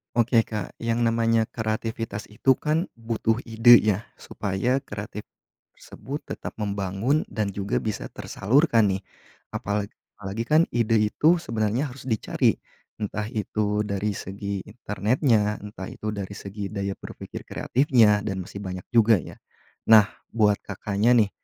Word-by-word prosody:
Oke 115 -1 +4
Kak, 105 -4 -5
yang 115 0 +1
namanya 115 -1 +2
kreativitas 110 -1 -3
itu 120 +5 +2
kan 160 +4 0
butuh 115 0 0
ide 115 +1 +7
ya 105 -1 +1 0.2
supaya 120 +8 -1
kreatif 105 -3 -7 0.5
tersebut 140 +2 -8 0.2
tetap - - -7
membangun 100 +7 0
dan 105 -3 -2
juga 100 0 -1
bisa 100 - -4
tersalurkan 115 -1 +2
nih. 95 +1 -2 0.5
Apalagi 100 0 -2 0.2
apalagi 105 +3 -4
kan 155 +7 +4
ide 115 -1 +3
itu 150 +11 +3
sebenarnya 115 -2 -1
harus 130 -2 -8
dicari, 110 - +1 0.4
entah 105 0 -3
itu 105 -2 -1
dari 100 +1 -1
segi 100 0 -4
internetnya, 105 0 0
entah 105 -2 -7
itu 105 - -5
dari 100 -1 -5
segi 100 +1 -6
daya 100 -1 -4
berpikir - - -9
kreatifnya, 120 -6 +3
dan 95 -2 -2
masih 100 +2 -9
banyak 95 -2 -6
juga 115 -1 +5
ya. 90 - -4 0.5
Nah 110 -2 +7 0.2
buat 105 -3 +3
Kakaknya 105 +4 0
nih, 100 - -2
105 Hz, 135 wpm, -25 LUFS, 100-115 Hz, 0.5 s, ide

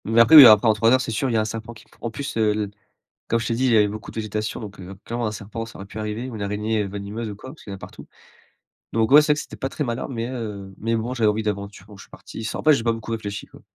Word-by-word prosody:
Mais 115 +2 +2
après 115 +8 +7
mais 145 -4 +13
après, 110 0 +7
en 110 - +5
3 110 +2 +2
heures, 130 - +5
c'est 125 - -4
sûr, 120 +4 -1
il 115 - 0
a 110 - +3
un - - -1
serpent 115 +2 -6
qui 105 - -16
pre - - -26
en 115 - -3
plus, 140 +4 -6
heu 110 -1 +3
l 105 -1 -3 0.6
comme 115 - +1
je 115 - -3
t'ai 115 - 0
dit, 130 +3 +1
il 125 - +3
y - - +5
avait 105 -1 +4
beaucoup 110 +2 -8
de - - -18
végétation, 105 -1 -3
donc, 100 -2 -9
heu, 95 +1 -9
clairement 120 0 -3
un 105 - -2
serpent, 110 +2 -6
ça 110 - -12
aurait 95 - -7
pu 100 - -9
arriver 110 +4 -4
ou 115 - -7
une 105 - -5
araignée 105 +1 -1
venimeuse 100 +3 -5
ou 105 - -6
quoi, 130 +5 -10
parce 155 - -14
qu'il 100 - -8
y - - -4
en - - -7
a - - -15
partout. - - -11 0.9
Donc, 115 -1 +1
ouais, 150 +2 +9
c'est 150 0 +1
vrai, 150 - -4
c'était - - -8
pas 135 - -4
très 150 - -3
malin, 120 0 -3
mais, 115 -3 -3
heu, 105 -6 -6
mais 115 +2 -2
bon, 115 +3 -3
j'avais 115 -4 +2
envie 105 +1 0
d'aventure 100 -3 -5
don 105 - -13
je 100 - -12
suis - - -20
parti 110 - -9
sans 110 - -4
après, 155 - +5
j'ai 135 - 0
pas 115 - +2
beaucoup 115 0 -6
réfléchi, 105 -2 -5
quoi. - - -17
110 Hz, 330 wpm, -23 LUFS, 105-115 Hz, 0.9 s, mais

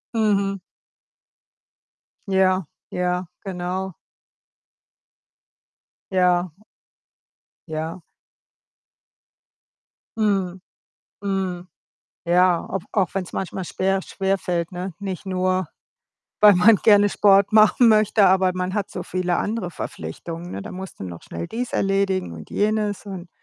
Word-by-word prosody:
Mhm. 200 -3 +1 1.7
Ja, 190 -1 +2 0.2
ja, 180 0 -1 0.2
genau. 185 0 -4 2.2
Ja. 180 -2 +2 1.2
Ja. 160 +3 -4 2.2
Mhm, 195 -4 0 0.6
mhm. 190 -3 -3 0.6
Ja, 175 0 +4
au 195 - -2
auch 195 -4 0
wenn's 190 -2 -3
manchmal 190 0 -4
schwer 190 +2 0
schwerfällt, 185 -4 -2
ne? 180 0 -5
Nicht 195 -1 -5
nur, 185 -2 0 0.7
weil 210 -1 +8
man 210 +5 +6
gerne 205 +1 +5
Sport 200 0 +4
machen 215 +3 +6
möchte, 215 -1 +4
aber 190 0 +4
man 185 +1 -2
hat 205 -2 -2
so - - -5
viele 180 -1 -1
andere 210 -4 -2
Verpflichtungen, 165 - -7
ne? 100 - -5
Da - - -8
musst 190 0 -8
du - - -4
noch 85 -2 -8
schnell 85 0 -6
dies 245 +2 -4
erledigen 195 - 0
und 80 -1 -10
jenes 210 -1 0
und 185 -3 -7
190 Hz, 110 wpm, -23 LUFS, 180-200 Hz, 2.2 s, weil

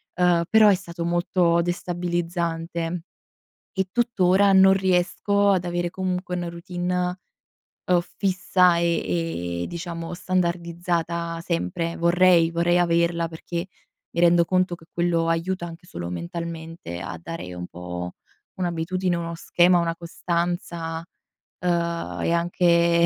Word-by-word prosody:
uhm, 175 -1 +3
però 220 -1 +7
è 200 - +6
stato 170 -2 -6
molto 175 0 +2
destabilizzante. 170 -1 -2 0.8
E 190 0 +1
tuttora 200 -5 +3
non 190 0 +7
riesco 190 +2 +2
ad 185 -2 +1
avere 175 0 -1
comunque 185 -1 -2
una 175 -1 -3
routine, 180 +1 -2 0.7
uhm, 180 -1 +3 0.2
fissa, 185 -2 +3
e, 165 - -1
ehm, - - -3
diciamo 170 -1 -5
standardizzata 170 -1 -1
sempre. 165 - -2
Vorrei 170 -1 +4
vorrei 170 +1 +2
averla 170 -1 +2
perché 170 +2 -5 0.4
mi 170 - -4
rendo 170 0 +5
conto 185 0 +1
che 165 -1 -9
quello 170 -1 +1
aiuta 175 +2 -1
anche 170 +1 -11
solo 85 - -6
mentalmente 160 - -6
a 85 -1 -6
dare 90 - -6
un 90 0 -6
po' 90 0 -6 0.4
un'abitudine, 180 +1 -1
uno 170 0 -4
schema, 175 +2 +3
una 165 -1 -1
costanza, 170 -1 -3 0.5
uhm, 170 -1 -1
e - - +1
anche 170 0 +3
170 Hz, 120 wpm, -24 LUFS, 165-180 Hz, 0.8 s, però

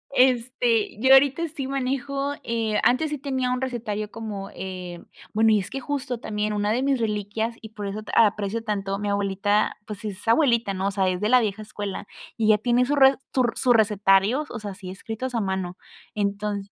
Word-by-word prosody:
Este, 245 -4 +2
yo 260 +2 +6
ahorita 285 +5 +5
sí 275 -3 -5
manejo, 275 +1 -2
eh, 225 -2 0
antes 290 +5 +3
sí 300 - -2
tenía 260 -2 -1
un 250 - 0
recetario 215 -5 -3
como, 210 -3 -6
eh 180 -2 -7 0.3
bueno, 220 +1 +4
y 210 - +4
es 190 - -5
que 270 - -4
justo 255 -4 -3
también, 210 -1 -2
una 205 0 0
de 245 +3 +1
mis 270 -2 +1
reliquias, 220 +1 -2
y 220 - -9
por 210 -2 -7
eso 210 +2 -4
ta - - -9
aprecio 210 +2 -2
tanto 200 -3 -2
a - - -3
mi 205 0 -2
abuelita, 200 +1 +1
pues, 210 -1 -8
es 205 0 -6
abuelita, 235 -5 +3
¿no? 190 +1 -1
O - - 0
sea, 190 -1 +1
es 180 0 -2
de 210 - +1
la 250 -1 +6
vieja 215 0 -2
escuela, 205 -2 -6 0.3
y 220 - 0
ella 215 -1 +5
tiene 245 +3 +2
su 290 +3 0
re 270 -1 +6 0.2
su 255 - +4
r 240 - +1
sus 245 -2 +3
recetarios, 210 +5 +3
o 235 - -6
sea, 205 -1 -6
así 190 -1 -9
escritos 225 +6 -5
a 230 - +1
mano. 190 -2 -3 0.4
Entonc 200 0 -2
220 Hz, 210 wpm, -24 LUFS, 200-250 Hz, 0.4 s, yo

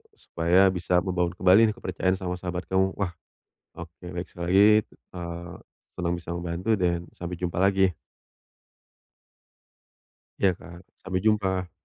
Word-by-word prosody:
supaya 90 - +3
bisa 90 0 +1
membangun 90 -2 -1
kembali 95 +5 +5
nih, - - -10
kepercayaan 95 -4 -1
sama 90 -1 -4
sahabat 90 0 -4
kamu. 95 0 +1
Wah, 95 -4 -2 0.7
oke. 85 +1 -11
Baik, 90 0 -5
sekali 85 -1 -7
lagi, 100 +2 +7 0.5
eee 85 0 -6 0.4
senang 85 -1 -2
bisa 85 0 -7
membantu 85 +5 -2
dan 85 -4 +1
sampai 85 0 -6
jumpa 90 0 -3
lagi. 95 -1 +3 2.5
Iya 95 - +4
Kak, 85 - -12 0.3
sampai 95 -1 -1
jumpa. 95 -4 +1
90 Hz, 130 wpm, -26 LUFS, 85-95 Hz, 2.5 s, lagi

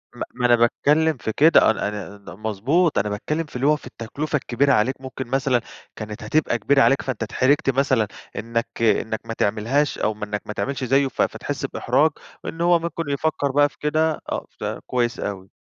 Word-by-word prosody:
ما - - -4
ما 125 - -2
أنا 120 0 +6
باتكلم 150 +6 +2
في 110 - -3
كده، 155 -6 +6
أنا 100 - -2
أنا 105 0 -6
ن 100 -2 -12
مضبوط، 130 - +1
أنا 105 - -1
باتكلم 150 +11 -2
في 145 - -17
اللي 130 +3 +1
هو 150 - +5
في 150 - -11
التكلفة 145 +7 -4
الكبيرة 140 +1 +2
عليك 130 +4 +1
ممكن 130 -1 -6
مثلًا 130 -1 +1 0.3
كانت 105 -1 -7
هتبقى 120 +2 +1
كبيرة 140 +5 +3
عليك، 135 0 +4
فأنت 125 -4 -3
اتحرجت 135 +5 +2
مثلًا 130 -4 +2 0.3
إنَّك 115 +2 -2
إنَّك 110 -1 +1
ما 115 - -4
تعملهاش 115 +8 0
أو 110 - +1
م 105 - -9
إنَّك 105 0 -3
ما 105 - -4
تعملش 135 +3 -3
زيه 135 +2 +3
ف 130 - -3
فتحس - - -2
بإحراج، 155 +2 +2 0.3
إن 165 - -5
هو 175 0 +4
ممكن 165 0 -3
يفكَّر 145 0 0
بقى 145 +1 +4
في - - -25
كده 155 +1 0
آه، - - -2
فكويس 120 -2 -2
أوي. 95 -2 -5
130 Hz, 195 wpm, -22 LUFS, 110-145 Hz, 0.3 s, أنا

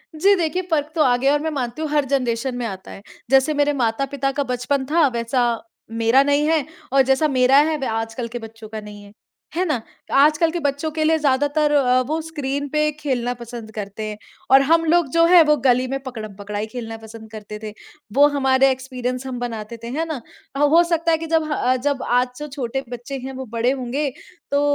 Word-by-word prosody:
जी 395 +6 +4
देखिए 355 0 -1
फ़र्क 300 -1 0
तो 320 - +2
आ 250 -3 +4
गया 270 +3 +2
है 295 - +3
और 295 - -6
मैं 320 - 0
मानती 260 0 -4
हूँ, 310 - -2
हर 295 -1 +1
जनरेशन 255 -2 -1
में 245 - -3
आता 190 -4 -7
है। - - -10 0.3
जैसे 270 +3 +4
मेरे 290 0 +2
माता-पिता 275 +2 -1
का 285 +1 -1
बचपन 255 +2 -1
था 325 -2 +5
वैसा 240 0 0 0.5
मेरा 230 +4 +3
नहीं 285 +1 +2
है 315 -4 +2 0.3
और 275 - +6
जैसा 265 +4 +2
मेरा 260 -1 +4
है 315 - 0
वह 270 -5 -3
आजकल 225 +2 -3
के 240 +1 -6
बच्चों 225 -1 -11
का 220 0 -5
नहीं 205 -1 -11
है। 200 - -15 0.4
है 355 - +1
ना? 300 -9 -1 0.3
आजकल 305 +4 +4
के 345 - -3
बच्चों 285 +1 -1
के 310 0 -1
लिए 320 +1 +3
ज़्यादातर 290 +1 +1
अ, 255 -3 +3
वो 310 +3 -1
स्क्रीन 285 -3 -3
पे 300 +1 +1
खेलना 250 -4 -1
पसंद 235 -2 -9
करते 205 0 -5
हैं। 210 - -6 0.3
और 270 +1 +8
हम 330 +4 +3
लोग 335 0 +3
जो 335 0 +4
हैं 350 0 +7
वो 300 -1 +4
गली 255 -1 +2
में 270 +1 -3
पकड़म-पकड़ाई 210 -4 -6
खेलना 225 -2 -5
पसंद 220 0 -12
करते 210 -1 -8
थे। 215 - -5 0.4
वो 285 +1 +7
हमारे 265 -1 +4
एक्सपीरियंस 255 -1 -4
हम 250 -2 -5
बनाते 230 -2 -5
थे, - - -5
है 300 +7 -2
ना। 305 -6 -4 0.4
ह - - -1
हो 335 +2 +6
सकता 335 -1 +1
है 325 - +3
कि 325 +1 -6
जब 320 0 +2
ह 255 -3 +1
जब 285 -2 0
आज 250 +1 +3
जो 300 - -5
छोटे 270 -2 -4
बच्चे 245 +3 -6
हैं 265 +1 -6
वो 265 0 -6
बड़े 235 +2 +2
होंगे 270 +2 -2 0.4
तो 285 0 +2
265 Hz, 220 wpm, -21 LUFS, 240-295 Hz, 0.5 s, और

